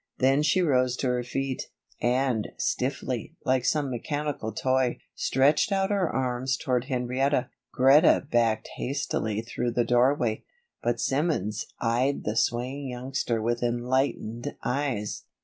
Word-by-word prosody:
Then 135 +2 +3
she 170 +5 +3
rose 130 -5 +2
to 130 - -1
her 125 0 0
feet, 135 +1 -3 0.3
and, 125 -2 +1
stiffly, - - -2
like 130 -1 +2
some 145 -3 +1
mechanical 145 -2 -3
toy, 130 +2 +1 0.2
stretched 140 +9 +2
out 195 0 +1
her 195 -5 +1
arms 130 0 -1
toward 125 -1 0
Henrietta. 130 0 0 0.2
Greta 135 +5 +5
backed 115 -2 +2
hastily 125 -6 -2
through 120 +1 -2
the 120 0 +1
doorway; 120 -2 +2 0.4
but 120 0 0
Simmons 120 - 0
eyed 125 +4 +1
the 105 - -2
swaying 125 +4 0
youngster 125 -2 -2
with 120 +1 0
enlightened 120 -1 -1
eyes. 125 -6 -2
125 Hz, 130 wpm, -27 LUFS, 120-135 Hz, 0.4 s, Greta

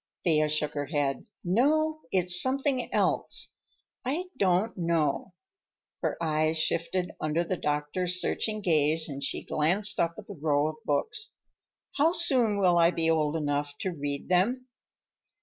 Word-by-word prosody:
Thea 155 -3 +2
shook 150 0 -1
her 145 -1 -3
head. 145 - -1 0.2
"No, 310 - +1
it's 180 -1 +5
something 265 -1 0
else. - - 0 0.5
I 320 +8 -3
don't 195 0 +1
know." 170 -1 -1 0.7
Her - - -1
eyes 155 -1 0
shifted 170 +3 0
under 155 +2 0
the 180 +2 -2
doctor's 170 +4 0
searching 215 +3 -1
gaze 160 -3 +2
and 140 -2 -6
she - - -2
glanced 195 +7 0
up 170 0 +1
at - - -9
the - - -9
row 150 0 +1
of 155 - -8
books. 430 - -2 0.6
"How 315 +4 +3
soon 255 - +3
will 180 -3 +3
I 170 0 +6
be 165 -2 0
old 155 -1 +1
enough 145 -2 -2
to 190 - -1
read 145 -3 -4
them?" 215 +9 +1
170 Hz, 150 wpm, -28 LUFS, 150-210 Hz, 0.7 s, I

